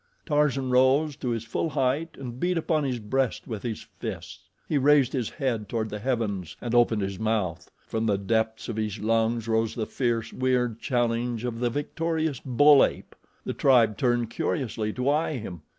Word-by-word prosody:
Tarzan 145 Hz, -4 st, +1 dB
rose 135 Hz, +4 st, +3 dB
to 130 Hz, -, -3 dB
his 115 Hz, -2 st, -2 dB
full 160 Hz, +7 st, -2 dB
height 145 Hz, +3 st, -1 dB
and 125 Hz, -2 st, -7 dB
beat 180 Hz, +2 st, +1 dB
upon 160 Hz, -1 st, +1 dB
his 130 Hz, -2 st, -1 dB
breast 120 Hz, +3 st, -1 dB
with 110 Hz, -4 st, -5 dB
his 115 Hz, -3 st, -5 dB
fists. 90 Hz, +1 st, -7 dB, 0.2 s
He 150 Hz, -, +1 dB
raised 140 Hz, -1 st, +4 dB
his 125 Hz, -5 st, -1 dB
head 120 Hz, -8 st, -2 dB
toward 110 Hz, -2 st, -2 dB
the 105 Hz, -, -4 dB
heavens 105 Hz, -8 st, -2 dB
and 120 Hz, -1 st, -4 dB
opened 120 Hz, -3 st, +3 dB
his 95 Hz, -1 st, -4 dB
mouth. 100 Hz, -7 st, -1 dB, 0.2 s
From 110 Hz, 0 st, -2 dB
the 100 Hz, -2 st, +2 dB
depths 110 Hz, +2 st, -1 dB
of 115 Hz, -, -4 dB
his 110 Hz, -1 st, -2 dB
lungs 115 Hz, +1 st, 0 dB
rose 110 Hz, 0 st, +1 dB
the 110 Hz, -, -2 dB
fierce, 120 Hz, -2 st, -1 dB
weird 125 Hz, -3 st, 0 dB
challenge 120 Hz, -2 st, -1 dB
of 115 Hz, -2 st, -3 dB
the 120 Hz, 0 st, +1 dB
victorious 155 Hz, +1 st, -2 dB
bull 140 Hz, +2 st, +6 dB
ape. -, -, -3 dB, 0.3 s
The -, -, -2 dB
tribe 120 Hz, -6 st, +4 dB
turned 120 Hz, -4 st, 0 dB
curiously 115 Hz, -9 st, -2 dB
to 125 Hz, +1 st, -2 dB
eye 155 Hz, +2 st, +2 dB
him. 90 Hz, -8 st, -7 dB
120 Hz, 180 wpm, -26 LUFS, 110-135 Hz, 0.3 s, bull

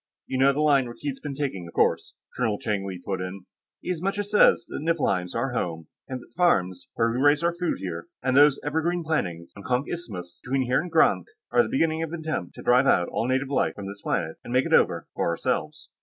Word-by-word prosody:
"You 130 Hz, -, -3 dB
know 135 Hz, +1 st, +6 dB
the 145 Hz, +2 st, -1 dB
line 140 Hz, -4 st, +4 dB
Rakkeed's 135 Hz, +3 st, -5 dB
been 145 Hz, -2 st, -6 dB
taking, 130 Hz, -12 st, -3 dB
of 85 Hz, -, -13 dB
course," -, -, +1 dB, 0.2 s
Colonel 110 Hz, -4 st, 0 dB
Cheng 100 Hz, -2 st, -2 dB
Li 95 Hz, -2 st, -5 dB
put 95 Hz, -2 st, -2 dB
in. 90 Hz, +1 st, -6 dB, 0.4 s
"He -, -, -3 dB
as 170 Hz, -3 st, -3 dB
much 195 Hz, +2 st, -1 dB
as 205 Hz, 0 st, -3 dB
says 210 Hz, -, +5 dB
that -, -, -5 dB
Niflheim's 115 Hz, -, 0 dB
our 125 Hz, +3 st, -1 dB
home, 80 Hz, -8 st, -3 dB, 0.2 s
and 130 Hz, -1 st, -4 dB
that -, -, -14 dB
the -, -, -28 dB
farms 95 Hz, -, +1 dB
where 115 Hz, 0 st, +2 dB
we 120 Hz, -, -2 dB
raise 145 Hz, +2 st, +4 dB
food 170 Hz, +1 st, 0 dB
here, 85 Hz, -3 st, -6 dB, 0.2 s
and 130 Hz, 0 st, +1 dB
those 145 Hz, 0 st, +6 dB
evergreen 160 Hz, +4 st, 0 dB
plantings 90 Hz, -, -2 dB
on 100 Hz, -, -10 dB
Konk 125 Hz, +6 st, 0 dB
Isthmus 90 Hz, -, -7 dB
and -, -, -11 dB
between 135 Hz, -1 st, +2 dB
here 125 Hz, -, +2 dB
and 180 Hz, -, -6 dB
Grank 165 Hz, -1 st, +3 dB, 0.2 s
are -, -, +5 dB
the -, -, -2 dB
beginning 165 Hz, -10 st, +1 dB
of 165 Hz, 0 st, -4 dB
an 170 Hz, -, -4 dB
attempt 155 Hz, -, -4 dB
to -, -, -10 dB
drive 125 Hz, +2 st, +4 dB, 0.2 s
all 115 Hz, -, -1 dB
native 130 Hz, +1 st, 0 dB
life 140 Hz, -, +1 dB
from 100 Hz, -, -7 dB
this 100 Hz, +1 st, -8 dB
planet 80 Hz, -4 st, -2 dB
and -, -, -8 dB
make 130 Hz, +1 st, +3 dB
it -, -, -1 dB
over -, -, +3 dB
for -, -, 0 dB
ourselves." 150 Hz, -, -2 dB
130 Hz, 240 wpm, -25 LUFS, 100-155 Hz, 0.4 s, know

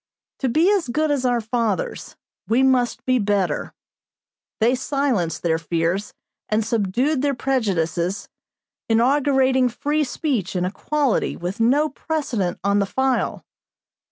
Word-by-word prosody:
To 265 Hz, -, 0 dB
be 315 Hz, +9 st, +3 dB
as 395 Hz, -7 st, +1 dB
good 300 Hz, +5 st, 0 dB
as 275 Hz, -3 st, 0 dB
our 245 Hz, -1 st, +2 dB
fathers, 235 Hz, -, -2 dB, 0.3 s
we 240 Hz, +4 st, +3 dB
must 255 Hz, -2 st, +1 dB
be 255 Hz, -1 st, +2 dB
better. 200 Hz, -3 st, 0 dB, 0.9 s
They 230 Hz, +3 st, +3 dB
silenced 255 Hz, -, -1 dB
their 165 Hz, -1 st, +1 dB
fears 170 Hz, +4 st, -2 dB, 0.3 s
and 215 Hz, 0 st, +1 dB
subdued 235 Hz, +7 st, 0 dB
their 285 Hz, -1 st, +1 dB
prejudices, 195 Hz, -8 st, -1 dB, 0.6 s
inaugurating 260 Hz, +1 st, +3 dB
free 295 Hz, +6 st, -1 dB
speech 250 Hz, -, -2 dB
and 180 Hz, 0 st, 0 dB
equality 270 Hz, +7 st, -1 dB
with 180 Hz, +4 st, -5 dB
no 270 Hz, +7 st, +3 dB
precedent 265 Hz, -, -2 dB
on 200 Hz, 0 st, +2 dB
the 200 Hz, -, +1 dB
file. 265 Hz, +3 st, 0 dB
245 Hz, 125 wpm, -22 LUFS, 200-275 Hz, 0.9 s, be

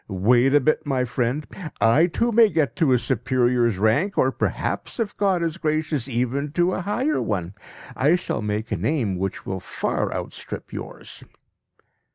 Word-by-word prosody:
Wait 120 Hz, +7 st, +3 dB
a 145 Hz, -, +5 dB
bit, 155 Hz, +3 st, +1 dB
my 135 Hz, -3 st, 0 dB
friend! 125 Hz, +4 st, -1 dB, 0.3 s
I 115 Hz, +11 st, +4 dB
too 235 Hz, +7 st, 0 dB
may 225 Hz, -1 st, +6 dB
get 155 Hz, -7 st, 0 dB
to 160 Hz, -7 st, +3 dB
a 125 Hz, -, +5 dB
superior's 120 Hz, -2 st, +1 dB
rank; 115 Hz, -, +1 dB
or 130 Hz, -, +3 dB
perhaps, -, -, -3 dB
if 225 Hz, -3 st, -2 dB
God 190 Hz, -4 st, +1 dB
is 165 Hz, 0 st, -2 dB
gracious, 155 Hz, -5 st, -1 dB
even 130 Hz, +3 st, -1 dB
to 175 Hz, +2 st, +2 dB
a -, -, -2 dB
higher 250 Hz, -, 0 dB
one. 95 Hz, -3 st, -2 dB, 0.4 s
I 150 Hz, +6 st, +3 dB
shall 175 Hz, -, -3 dB
make 105 Hz, +1 st, -3 dB
a -, -, 0 dB
name 125 Hz, -11 st, 0 dB
which 95 Hz, +1 st, -4 dB
will 95 Hz, 0 st, -3 dB
far 90 Hz, -, -2 dB
outstrip -, -, -6 dB
yours. -, -, -8 dB
135 Hz, 170 wpm, -23 LUFS, 115-165 Hz, 0.4 s, may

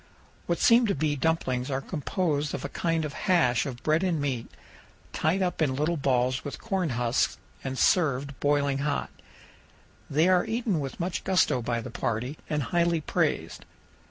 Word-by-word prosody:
What 170 Hz, -, +1 dB
seem 235 Hz, 0 st, +5 dB
to 200 Hz, -, +1 dB
be 150 Hz, +1 st, 0 dB
dumplings 130 Hz, -4 st, 0 dB
are 135 Hz, -1 st, 0 dB
composed 150 Hz, 0 st, -2 dB
of -, -, -5 dB
a -, -, -4 dB
kind 165 Hz, -2 st, -1 dB
of 145 Hz, -, -5 dB, 0.2 s
hash 125 Hz, -11 st, +3 dB
of 125 Hz, -3 st, -7 dB
bread 155 Hz, +2 st, +2 dB
and 180 Hz, -4 st, 0 dB
meat, 135 Hz, -5 st, -2 dB, 0.6 s
tied 180 Hz, +5 st, +1 dB
up 180 Hz, -2 st, -2 dB
in 135 Hz, -4 st, +2 dB
little 155 Hz, +5 st, 0 dB
balls 130 Hz, -3 st, +1 dB
with 145 Hz, -, -6 dB
cornhusks 140 Hz, -, 0 dB, 0.3 s
and 130 Hz, -1 st, -4 dB
served 140 Hz, -7 st, +2 dB
boiling 145 Hz, -1 st, +1 dB
hot. 145 Hz, +1 st, -1 dB, 1.0 s
They 155 Hz, +5 st, +3 dB
are 185 Hz, -1 st, +4 dB
eaten 225 Hz, -6 st, -1 dB
with 135 Hz, -2 st, -5 dB
much 175 Hz, 0 st, -2 dB
gusto 180 Hz, -9 st, +2 dB
by 120 Hz, 0 st, -1 dB
the -, -, -8 dB
party 125 Hz, +6 st, -3 dB
and 150 Hz, -2 st, 0 dB
highly 170 Hz, +3 st, +1 dB
praised. -, -, -1 dB
150 Hz, 165 wpm, -27 LUFS, 130-170 Hz, 1.0 s, seem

